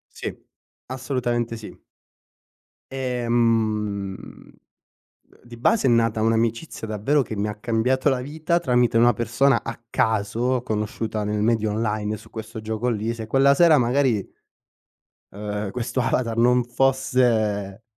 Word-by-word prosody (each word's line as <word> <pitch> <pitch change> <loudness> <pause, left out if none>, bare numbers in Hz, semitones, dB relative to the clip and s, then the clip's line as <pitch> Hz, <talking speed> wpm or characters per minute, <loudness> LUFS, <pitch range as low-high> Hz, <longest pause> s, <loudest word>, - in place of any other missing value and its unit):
Sì, - - -4 0.5
assolutamente 120 -3 -2
sì. 110 - -12 1.1
Ehm, 115 -6 0
uhm, - - -14 0.9
di 120 -1 -12
base 135 - +2
è - - +4
nata 115 -2 +2
un'amicizia 115 +2 -1
davvero 110 +8 +1
che 110 - -5
mi 100 +1 -1
ha 105 - -4
cambiato 120 +5 +1
la 130 -2 0
vita, 160 +5 -1
tramite 125 -6 +2
una 120 +1 +5
persona 120 +5 +1
a 115 0 -6
caso, 115 +4 0
conosciuta 110 -1 -3
nel 105 0 -1
media 110 0 +1
online, 105 0 -2
su - - -16
questo 110 0 -8
gioco 110 +3 -2
lì. 115 0 -1
Se 110 -2 -7
quella 135 +4 +4
sera 160 +1 +5
magari, 125 -4 +1 1.0
uhm, 105 0 -4
questo 125 +2 -2
avatar 115 -1 -1
non 125 +1 +4
fosse 120 -5 +1
115 Hz, 130 wpm, -23 LUFS, 110-125 Hz, 1.1 s, una